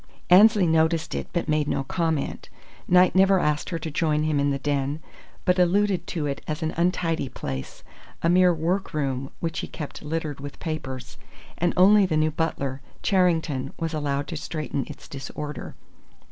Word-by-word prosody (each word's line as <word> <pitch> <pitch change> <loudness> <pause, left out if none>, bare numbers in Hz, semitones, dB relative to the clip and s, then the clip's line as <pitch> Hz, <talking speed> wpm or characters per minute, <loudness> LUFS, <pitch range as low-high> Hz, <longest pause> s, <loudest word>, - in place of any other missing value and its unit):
Annesley 205 +1 +7
noticed 160 0 +2
it, - - -3
but 170 - -2
made 150 -1 +1
no 135 - 0
comment. 160 0 -2 0.4
Knight 180 0 +5
never 190 0 +5
asked 150 -2 0
her 170 - -2
to 160 -1 -5
join 155 0 +1
him 155 -2 +1
in 140 0 +2
the 140 - 0
den, 140 +1 -1 0.5
but 180 0 +3
alluded 185 0 +2
to 160 -4 -2
it 140 -1 -3
as 155 +1 -3
an 160 - -1
untidy 170 -4 0
place, 65 - -6 0.4
a - - +3
mere 180 +1 +5
work 170 +2 -1
room 135 -2 -1
which 165 -1 -2
he - - -4
kept 150 -3 -7
littered 150 -2 -3
with 140 0 -8
papers; 130 -5 -6 0.4
and 175 0 +2
only 195 +2 +6
the 160 -3 0
new 155 0 +2
butler, 140 -4 -2 0.2
Charrington, 165 -8 +1
was 165 -1 -3
allowed 145 -2 -1
to 165 - -4
straighten 150 -3 -4
its - - -10
disorder. 145 +2 -7
160 Hz, 175 wpm, -25 LUFS, 145-175 Hz, 0.5 s, Annesley